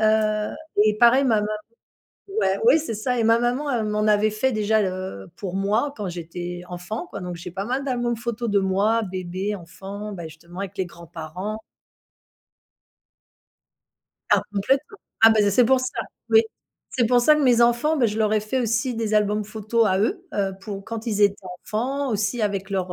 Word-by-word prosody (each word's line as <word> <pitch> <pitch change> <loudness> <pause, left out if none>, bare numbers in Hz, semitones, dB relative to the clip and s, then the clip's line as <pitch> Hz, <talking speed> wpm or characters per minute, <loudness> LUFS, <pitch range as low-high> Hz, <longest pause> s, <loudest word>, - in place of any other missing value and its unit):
heu, 215 -1 +2 0.3
et 215 0 +2
pareil, 245 +4 +6
ma 235 -4 +3
maman 210 - -2 0.9
ouais, - - +1
oui, 470 - +7
c'est 300 -7 -4
ça 245 +4 -1
et 230 - +2
ma 225 +1 +5
maman 245 0 0
m'en 210 0 0
avait 210 +1 +4
fait 235 +5 0
déjà, 215 0 +2
heu, 185 - -4
pour 190 -3 -5
moi 215 +8 +1
quand 205 -3 -4
j'étais 175 +1 -6
enfant, 180 - -5
quoi. 200 - -6
Donc 180 -1 -5
j'ai 175 +2 -8
pas 195 +2 -3
mal 260 +3 -1
d'albums 240 -3 -1
photos 235 0 -3
de 205 - +3
moi, 200 +4 +2
bébé, 185 +1 -3
enfant, 195 +4 -8
bah, 175 -4 -7
justement, 170 +4 -11
avec 200 0 -6
les 190 - 0
grands-parents. 170 +5 -7 2.7
Ah, - - +5
complètement. 270 - 0 0.3
Ah 225 - +10
bah, 220 -1 +4
c 205 -1 +3
c'est 245 +5 +5
pour 260 +2 +4
ça. 255 - -1 0.4
Oui, 445 - +7 0.5
c'est 250 - 0
pour 245 +1 +4
ça 305 +5 +6
que 300 - +1
mes 245 -3 +4
enfants, 240 +7 +3
bah, 255 -5 +3
je 210 -1 -3
leur 215 -1 +2
ai 215 - +4
fait 215 +5 -2
aussi 235 +2 0
des 225 -1 -2
albums 210 0 +2
photos 220 +2 0
à 185 - +2
eux. 360 - 0
Heu, 195 -6 0
pour 195 -1 -7
quand 225 0 -5
ils 210 -3 -1
étaient 200 -1 +5 0.3
enfants, 270 +6 -2
aussi 210 +2 -1
avec 200 -2 -1
leurs, 185 -2 -2
215 Hz, 190 wpm, -23 LUFS, 195-235 Hz, 2.7 s, Ah